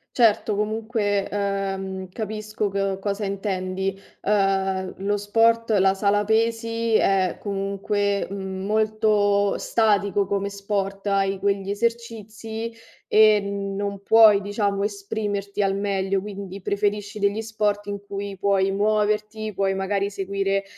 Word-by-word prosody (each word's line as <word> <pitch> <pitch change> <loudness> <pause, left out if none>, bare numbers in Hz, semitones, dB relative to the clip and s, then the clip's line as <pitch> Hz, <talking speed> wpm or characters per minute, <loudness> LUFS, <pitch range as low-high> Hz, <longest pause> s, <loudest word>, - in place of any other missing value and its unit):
Certo, 220 -3 +3
comunque, 210 -1 -1
ehm, 195 -2 -3
capisco 215 0 -3
co 195 -1 -1
cosa 200 +1 -2
intendi, 195 -1 -2 0.2
uhm, 195 -2 +1
lo 205 +2 0
sport, 230 +2 +2
la 190 0 +4
sala 205 +1 +2
pesi 230 +1 0
è 190 -4 +2
comunque, 200 0 -1
mhmm, 190 -1 -5
molto 210 -1 +2
statico 205 -3 +1
come 200 0 -1
sport, 200 0 -3
hai 195 -1 +1
quegli 200 0 0
esercizi 225 0 -3 0.4
e 215 -1 +6
non 200 0 -3
puoi, 215 -2 +7
diciamo, 200 -1 -1
esprimerti 205 0 -3
al 195 0 +1
meglio, 195 -1 0
quindi 200 -1 -7
preferisci 205 +1 -1
degli 200 +2 +1
sport 210 -2 -1
in 200 0 -4
cui 200 -1 -6
puoi 195 0 +2
muoverti, 215 +1 0
puoi 195 0 +1
magari 195 +1 -1
seguire, 195 0 -1
200 Hz, 120 wpm, -24 LUFS, 195-215 Hz, 0.4 s, puoi